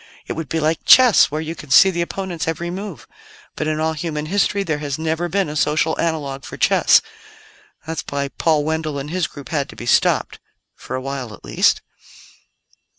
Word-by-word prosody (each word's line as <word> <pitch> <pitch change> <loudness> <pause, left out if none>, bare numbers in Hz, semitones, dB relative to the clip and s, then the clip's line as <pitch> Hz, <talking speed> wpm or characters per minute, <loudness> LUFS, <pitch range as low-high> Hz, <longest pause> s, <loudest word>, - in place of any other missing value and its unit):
It - - -4
would 160 -4 -6
be 165 - -1
like 160 +1 0
chess, 255 -4 +7
where 155 +2 -3
you 160 +1 -4
can 150 -3 -12
see 190 +8 +7
the 170 -1 -2
opponent's 175 -1 -4
every 170 +1 -3
move. 200 +3 -7 0.5
But 155 - -3
in 155 0 -1
all 160 0 0
human 150 -1 -4
history 200 +3 +1
there 155 -5 -2
has 145 -1 -3
never 160 +2 -2
been 195 +1 0
a 150 - -6
social 155 +1 +1
analogue 145 -5 -2
for - - -9
chess. - - +4 0.8
That's 160 0 -4
why 140 0 -2
Paul 155 0 +1
Wendell 155 -1 -2
and 140 +2 -5
his 180 -2 0
group 140 +1 -11
had 145 -4 -1
to - - -11
be 120 - -8
stopped 120 - +2 0.4
for 130 - -7
a 130 - -3
while 130 -5 -5
at - - -18
least." - - +2
160 Hz, 200 wpm, -20 LUFS, 145-170 Hz, 0.8 s, chess